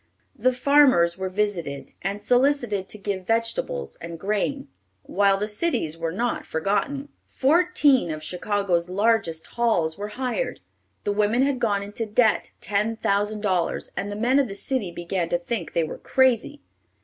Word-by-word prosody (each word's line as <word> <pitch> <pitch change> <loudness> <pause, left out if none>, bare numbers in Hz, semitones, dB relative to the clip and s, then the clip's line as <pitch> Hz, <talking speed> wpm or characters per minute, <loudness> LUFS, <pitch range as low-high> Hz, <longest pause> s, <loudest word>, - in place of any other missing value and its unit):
The 255 0 +2
farmers 255 -10 +4
were 190 0 -3
visited, 185 -8 -2
and 200 +2 -2
solicited 245 -4 +1
to - - -4
give 195 -2 -4
vegetables 225 - -1
and 170 0 -7
grain, 215 - -1 0.4
while 200 0 +2
the 210 +2 -2
cities 210 - 0
were 165 0 -3
not 235 +7 -1
forgotten. 210 - -1 0.2
Fourteen 290 - +3
of 155 -1 -5
Chicago's 180 -1 -1
largest 195 -5 +1
halls 195 -8 0
were 205 - -3
hired. 260 - -2 0.4
The 205 - 0
women 210 +5 +2
had 275 -2 0
gone 205 -4 +1
into 210 +3 -5
debt 220 +1 +2
ten 210 +2 0
thousand 205 +1 0
dollars, 185 -5 -1
and 205 - -3
the - - -4
men 245 +6 +2
of 275 - +2
the 195 - -7
city 225 -2 -2
began 175 0 -3
to 175 - +2
think 215 +7 -4
they 170 - +2
were 155 - -6
crazy. 260 +2 +1
205 Hz, 160 wpm, -24 LUFS, 185-245 Hz, 0.4 s, farmers